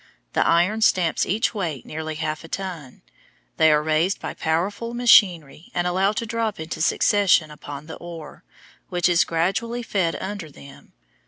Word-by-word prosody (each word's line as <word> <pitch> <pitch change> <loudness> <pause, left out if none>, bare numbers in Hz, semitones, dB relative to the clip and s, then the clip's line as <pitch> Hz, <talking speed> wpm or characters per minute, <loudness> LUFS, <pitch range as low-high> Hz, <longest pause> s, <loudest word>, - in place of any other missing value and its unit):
The - - +3
iron 180 +6 +2
stamps 180 -6 +2
each 215 +5 0
weigh 170 - -3
nearly 155 0 -5
half 155 0 -3
a - - -10
ton. 170 -8 -7 0.5
They 160 - +5
are 150 0 +3
raised 160 +5 +1
by - - -5
powerful 200 +9 -2
machinery 180 - +4
and 175 - 0
allowed 190 +4 +1
to 230 - -2
drop 225 -2 -2
in 160 0 -7
succession 170 0 +2
upon 145 -1 -9
the 160 - -9
ore, 165 -3 -10 0.5
which 175 -1 +1
is 175 -1 +4
gradually 195 +9 -1
fed 185 -7 -1
under 190 -4 -6
them. 140 -1 -15
175 Hz, 160 wpm, -23 LUFS, 160-200 Hz, 0.5 s, They